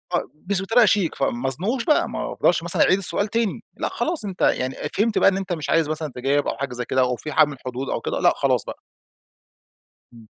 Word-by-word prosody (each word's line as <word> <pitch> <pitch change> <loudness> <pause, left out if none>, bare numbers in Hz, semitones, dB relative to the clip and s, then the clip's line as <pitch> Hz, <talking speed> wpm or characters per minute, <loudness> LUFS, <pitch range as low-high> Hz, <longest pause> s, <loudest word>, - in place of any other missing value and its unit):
آه، - - +1 0.3
مش 195 -2 +1
بطريقة 225 +4 +4
شيك 195 -5 +1
فما 135 -1 -1
ازنقهوش 200 - -1
بقى، 305 - +2
ما - - -4
افضلش 175 - +1
مثلًا 170 - +1
أعيد 185 - +4
السؤال 200 +2 +2
تاني 230 -2 -2
لأ، - - -2
خلاص 320 -9 -1
أنت 190 -2 -7
يعني 130 +1 +1 0.2
فهمت 215 +2 +1
بقى - - +6
إن 190 - -2
أنت 190 -2 -3
مش 155 -3 -5
عايز 165 -2 +2
مثلًا 155 -2 -3
تجاوب 140 +3 0
أو - - -2
حاجة 135 -2 -4
زي 125 -1 -4
كده 130 0 +1
أو 125 -1 +1
في 155 +5 -7
حد 155 0 +5
من 145 - -6
الحدود 130 0 -6
أو - - -2
كده - - -3
لأ، - - +4
خلاص - - +1
بقى. - - -8 1.3
امم. 115 -2 -16
160 Hz, 230 wpm, -22 LUFS, 135-200 Hz, 1.3 s, بقى